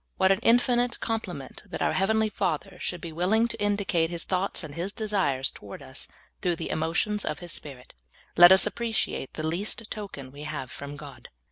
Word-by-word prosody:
What 190 0 +4
an 195 - +3
infi 240 +2 +4
nite 245 0 0
compliment 190 - -4
that - - -5
our - - +2
heavenl}^ 220 +2 +2
Father 180 +3 -1
should 180 - -3
be 170 - -6
willing 195 +8 +2
to 230 -2 -5
indicate 200 -5 +1
His 170 -1 -1
thoughts 185 0 0
and 150 -3 -7
His 180 +6 -2
desires 190 -12 0
toward 100 -1 -10
us - - -5 0.3
through 175 -2 +1
the - - -4
emotions 165 +7 0
of - - -2
His 175 -2 -7
Spirit! 135 -5 -8 0.4
I^et 175 +1 +10
us 190 - +8
appre 235 +2 -3
ciate 135 - -1
the 155 - -4
least 205 +7 -2
token 190 -11 -7
we 145 +2 -11
have 150 -5 -5
from 140 +2 -7
God. 145 -1 -11
180 Hz, 200 wpm, -27 LUFS, 155-210 Hz, 0.4 s, I^et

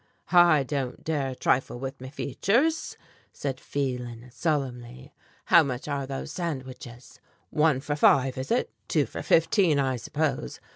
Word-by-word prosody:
"I 175 -5 +6
don't 135 -2 -4
dare 140 -5 -1
trifle 125 0 0
with 135 +1 -6
me 130 - -7
features," 230 - 0 0.3
said 135 -2 -4
Phelan 125 -3 -4
solemnly. 130 -3 -3 0.3
"How 170 -2 +7
much 130 -3 -3
are 140 -2 -2
those 135 0 -5
sandwiches. 130 -7 -6 0.3
One 150 -3 +2
for 145 +1 -2
five, 135 -3 +4
is 130 - -5
it? 240 - +1 0.2
Two - - +2
for - - -7
fifteen, 165 -1 +3
I 135 -2 +1
suppose. 140 +4 -2
135 Hz, 140 wpm, -27 LUFS, 130-155 Hz, 0.3 s, How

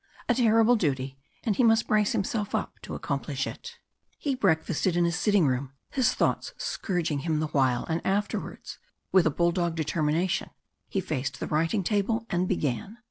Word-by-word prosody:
A 245 - +4
terrible 230 -1 +4
duty, 135 - -1 0.2
and 220 -5 +1
he 250 - +3
must 225 0 +4
brace 210 -1 +2
himself 205 +1 -1
up - - -3
to - - -6
accomplish - - -2
it. 475 -1 -8 0.4
He 285 - -1
breakfasted 175 - +1
in 175 - +4
his 170 -1 0
sitting 200 -2 +3
room, 130 0 -1 0.2
his 260 -4 +2
thoughts - - 0
scourging 170 -7 -1
him 155 +1 0
the 155 -1 -1
while, 130 -4 +2
and 165 +1 -2
afterwards, 205 +2 -2 0.3
with 185 -4 +5
a - - +4
bulldog 170 +2 +1
determination, 160 +3 0 0.4
he 195 - -1
faced 140 -7 -3
the - - -2
writing 165 +6 +1
table 220 +4 0
and 175 +1 +1
began. 165 - -2
175 Hz, 170 wpm, -27 LUFS, 155-210 Hz, 0.4 s, with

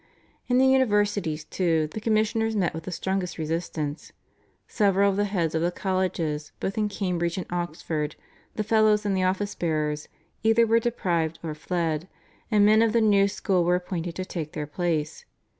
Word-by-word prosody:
In 250 - +2
the 260 - +5
universities, 205 -11 +2
too, 165 -2 +1
the 215 - -6
commissioners 220 0 +1
met 185 -5 +1
with 160 0 -7
the 185 - -5
strongest 190 0 -2
resistance. 160 -2 -3 0.6
Several 200 -1 +3
of - - -3
the 205 +1 +1
heads 175 -6 -1
of 160 - 0
the 170 - +2
colleges, 175 -6 -2
both 195 - -2
in 210 -1 0
Cambridge 180 -4 -2
and 185 - -3
Oxford, 165 -3 -3 0.4
the 215 - -1
fellows 215 -1 +3
and 200 -1 +1
the 190 - +1
office 190 +2 0
bearers, 155 -3 -1 0.3
either 225 +1 +4
were 230 +1 +4
deprived 170 -9 -1
or 160 -2 -3
fled, 165 0 -2 0.4
and 210 -3 +4
men 215 +1 +6
of 225 -1 +3
the 235 - +4
new 200 -2 +4
school 195 -3 0
were 175 +1 +3
appointed 175 -1 -4
to 185 - -4
take 160 -5 -5
their 150 -1 -3
places. 155 -1 -2
185 Hz, 175 wpm, -26 LUFS, 165-210 Hz, 0.6 s, men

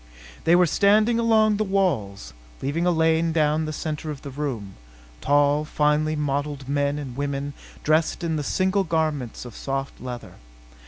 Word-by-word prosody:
They 165 +1 +6
were 180 0 +5
standing 210 +7 +3
along 220 -2 +3
the 215 - +1
walls, 160 - -1 0.3
leaving 165 +6 -1
a - - +4
lane 160 0 +2
down 155 0 +1
the 155 - -3
center 155 0 -4
of 145 -3 -6
the 140 - -7
room 130 -9 -4 0.5
tall, 145 +1 +3
finely 150 0 +1
modelled 145 -1 -2
men 145 +1 0
and 135 -4 -6
women 140 0 -3 0.3
dressed 155 +2 +1
in 165 -1 0
the 150 - -1
single 190 +6 +1
garments 155 -9 -2
of 120 - -10
soft 135 0 -4
leather. 125 -1 -7
150 Hz, 160 wpm, -24 LUFS, 140-165 Hz, 0.5 s, They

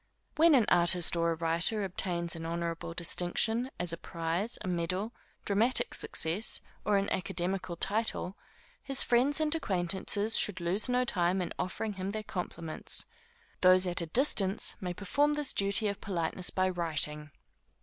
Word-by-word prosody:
When 325 -1 +6
an 240 -5 +4
artist 175 0 +3
or 170 0 +1
a 165 - 0
writer 170 +6 0
obtains 175 -2 -2
any 165 0 -7
honorable 165 0 -4
distinction, 215 +8 +1
as 175 -1 +1
a - - -4
prize, 170 +8 -3
a - - -5
medal, 185 +5 -2 0.3
dramatic 230 - +2
success, 175 +8 -2 0.2
or 205 -1 +2
an 195 - 0
academical 180 0 -1
title, 200 0 -1 0.5
his 275 -1 +4
friends 260 +5 +3
and 310 0 +1
acquaintances 200 - -1
should 205 -3 +2
lose 180 +8 +1
no 250 0 +2
time 180 -3 +1
in 175 -2 -3
offering 205 +4 -3
him 190 +1 -4
their 215 0 -4
compliments. 170 -4 -5 0.6
Those 185 0 +6
at 175 -1 +1
a 170 - -4
distance, 200 - +2
may 180 -1 -4
perform 290 +10 +1
this 295 -2 0
duty 200 +2 +3
of 200 -1 -4
politeness 180 -1 -2
by 185 0 +1
writing. 150 -4 -2
185 Hz, 155 wpm, -30 LUFS, 170-215 Hz, 0.6 s, When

